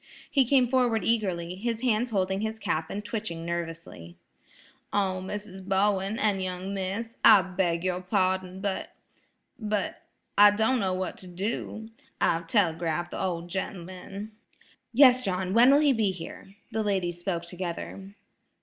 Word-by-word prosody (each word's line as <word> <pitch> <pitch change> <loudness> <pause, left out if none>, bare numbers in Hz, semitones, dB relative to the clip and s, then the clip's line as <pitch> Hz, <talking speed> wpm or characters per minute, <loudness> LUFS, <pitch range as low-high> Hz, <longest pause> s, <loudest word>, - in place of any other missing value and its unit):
He 270 -3 +4
came 255 0 +4
forward 240 -5 +2
eagerly, 185 -7 0
his 230 +4 -3
hands 245 -1 +1
holding 190 -2 0
his 220 0 -3
cap 160 -6 -2
and 205 +1 -5
twitching 205 -7 -4
nervously. 165 - -6 0.8
"Oh, 190 -2 0
Mrs. 195 -1 -6
Bowen 195 +2 +1
an' 205 -3 +1
young 185 +1 -4
Miss, 200 +4 -4
I 195 - +8
beg 180 -2 -1
your 185 -1 -1
pardon, 185 -1 0
but–but–I 205 +1 -1
don't 225 +4 +2
know 190 -3 0
what 185 0 -3
to 185 - -7
do. 215 +4 -4 0.3
I've 165 0 +1
telegraphed 170 -3 +1
the - - -4
ol' 175 -3 -2
gent'man– 190 +3 -6 0.6
"Yes, 255 0 +6
John–when 190 +5 +3
will 285 +2 +6
he 290 -3 +4
be 220 -4 +1
here?" 190 +2 -8 0.2
The 220 0 -1
ladies 185 -4 -1
spoke 175 -2 -3
together. 185 +3 -6
190 Hz, 140 wpm, -27 LUFS, 180-220 Hz, 0.8 s, I